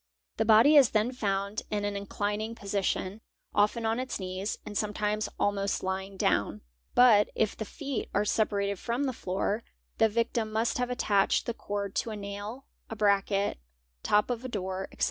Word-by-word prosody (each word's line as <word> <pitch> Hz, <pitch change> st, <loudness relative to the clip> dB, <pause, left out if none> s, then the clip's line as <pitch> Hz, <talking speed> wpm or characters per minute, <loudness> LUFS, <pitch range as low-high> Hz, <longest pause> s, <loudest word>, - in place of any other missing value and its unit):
The -, -, +1 dB
body 230 Hz, +8 st, +7 dB
is 270 Hz, -5 st, +7 dB
then 215 Hz, +4 st, +1 dB
found 200 Hz, -4 st, -1 dB
in 205 Hz, -1 st, -1 dB
an 205 Hz, 0 st, -2 dB
inclining 205 Hz, +2 st, -3 dB
Osition, 200 Hz, 0 st, -2 dB, 0.3 s
often 210 Hz, +3 st, +2 dB
on 225 Hz, +2 st, +1 dB
its 255 Hz, -3 st, -3 dB
knees, 185 Hz, +2 st, -3 dB
and 210 Hz, -, -7 dB
sometimes 210 Hz, 0 st, -1 dB
almost 200 Hz, -1 st, 0 dB
lying 190 Hz, +1 st, -3 dB
down; -, -, +1 dB, 0.3 s
but 220 Hz, -4 st, +6 dB
if 215 Hz, -, +1 dB
the 220 Hz, -, -5 dB
feet 275 Hz, +3 st, -4 dB
are 205 Hz, +1 st, +1 dB
separated 200 Hz, -2 st, 0 dB
from 235 Hz, +4 st, -1 dB
the 265 Hz, -2 st, -1 dB
floor, 200 Hz, +2 st, -2 dB, 0.4 s
the 225 Hz, -, +5 dB
victim 230 Hz, 0 st, -1 dB
must 225 Hz, +3 st, 0 dB
have 250 Hz, 0 st, 0 dB
attached 205 Hz, -5 st, +2 dB
the 235 Hz, -, -2 dB
i) 205 Hz, -2 st, -3 dB
d -, -, -22 dB
to -, -, -1 dB
a 215 Hz, -, -4 dB
nail, 205 Hz, +5 st, -6 dB, 0.2 s
a 225 Hz, -, -5 dB
bracket, 200 Hz, -, +1 dB, 0.4 s
top 210 Hz, +4 st, +2 dB
of 240 Hz, 0 st, -3 dB
a -, -, -3 dB
door, 190 Hz, -3 st, -3 dB
etc. -, -, -17 dB
210 Hz, 180 wpm, -29 LUFS, 200-225 Hz, 0.4 s, body